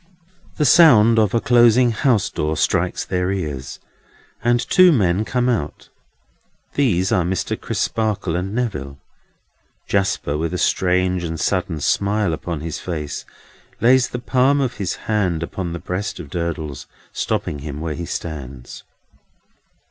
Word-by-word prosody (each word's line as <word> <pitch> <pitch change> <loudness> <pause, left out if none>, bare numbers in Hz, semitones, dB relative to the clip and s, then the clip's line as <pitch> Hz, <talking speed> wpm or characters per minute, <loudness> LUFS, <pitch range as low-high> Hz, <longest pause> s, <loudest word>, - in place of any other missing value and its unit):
The 150 - +2
sound 115 -7 +6
of 105 0 +2
a - - +4
closing 120 +1 +4
house 110 -5 +1
door 75 +1 -2
strikes - - 0
their 90 +1 -1
ears, 75 -9 -4 0.6
and 120 0 +3
two 185 +7 +5
men 100 - +2
come 125 +1 0
out. 100 -12 -2 0.8
These 100 -10 +1
are 90 - +2
Mr. 90 +1 -2
Crisparkle 105 -6 -2
and 90 +2 -2
Neville. 85 - -3 0.9
Jasper, 95 -7 -1
with 80 0 -2
a - - 0
strange 90 0 +1
and 80 -1 -4
sudden 90 -4 -1
smile 100 +1 +1
upon 80 -1 -4
his 80 0 -5
face, 75 -5 -5 0.5
lays 125 +2 +4
the - - -4
palm 130 +3 +2
of 130 -3 -1
his 95 -3 -2
hand 95 -7 0
upon 85 0 -4
the 85 - -4
breast 90 +4 -4
of 75 -5 -9
Durdles, 80 -6 -4 0.3
stopping 75 - -2
him 75 0 -6
where 80 -1 -3
he 85 +2 -6
stands. 70 -8 -7
90 Hz, 140 wpm, -20 LUFS, 80-115 Hz, 0.9 s, sound